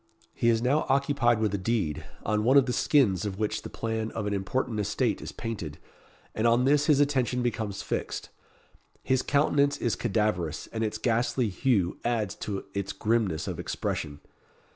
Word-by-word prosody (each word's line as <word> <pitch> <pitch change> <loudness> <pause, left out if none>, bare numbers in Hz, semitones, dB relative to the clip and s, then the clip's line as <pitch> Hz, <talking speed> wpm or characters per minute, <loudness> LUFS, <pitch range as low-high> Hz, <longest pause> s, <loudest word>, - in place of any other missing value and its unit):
He 120 - +2
is 115 0 +2
now 140 +5 +2
occupied 135 -3 +3
with 110 -2 0
a 100 - 0
deed, 90 -8 -1 0.2
on 105 0 +1
one 130 +5 +5
of 135 - +6
the 125 - -1
skins 110 - +3
of 100 -2 -3
which 105 0 -1
the - - -8
plan 110 -1 -3
of 110 - -3
an 105 - -1
important 105 +3 -1
estate 105 - 0
is - - -6
painted, 100 -10 -5 0.6
and 110 +2 +1
on 120 +2 +4
this 145 +2 +3
his 150 -3 +5
attention 130 -4 +1
becomes 110 -5 -2
fixed. - - -3 0.7
His 130 -1 +2
countenance 145 0 +2
is 120 - 0
cadaverous, 100 -8 -1
and 115 0 -1
its 110 - -1
ghastly 120 0 +1
hue 100 -4 +1
adds 115 -4 0
to 100 -2 -4
its 100 0 -3
grimness 105 -5 0
of - - -4
expression. 75 -2 -3
115 Hz, 175 wpm, -28 LUFS, 100-125 Hz, 0.7 s, of